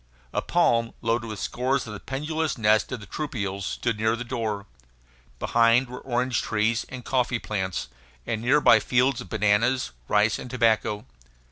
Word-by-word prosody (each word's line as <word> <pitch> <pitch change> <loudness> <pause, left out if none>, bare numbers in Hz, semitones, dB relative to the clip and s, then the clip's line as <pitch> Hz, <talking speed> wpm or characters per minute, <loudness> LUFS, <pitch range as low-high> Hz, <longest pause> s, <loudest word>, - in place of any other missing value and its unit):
A - - 0
palm, 115 -9 +2
loaded 115 0 0
with 110 -2 -5
scores 130 +5 -1
of 110 - -7
the 105 - -7
pendulous 155 +3 -2
nests 110 -1 +3
of 125 -3 -4
the - - -9
troupials, 100 -8 -4
stood 115 -3 -2
near 110 +1 +2
the 120 - -5
door. 110 -5 -3 0.7
Behind 115 - +3
were 125 +1 -8
orange 125 -1 0
trees 110 +1 0
and 125 -2 -8
coffee 125 -2 +1
plants, 95 -9 -3 0.4
and 110 -1 -2
near 130 +5 +4
by 115 - +7
fields 125 +3 +1
of - - -10
bananas, 110 +4 +2 0.2
rice, 105 +1 +2
and 125 - -7
tobacco. 110 -4 +1
115 Hz, 165 wpm, -25 LUFS, 105-125 Hz, 0.7 s, by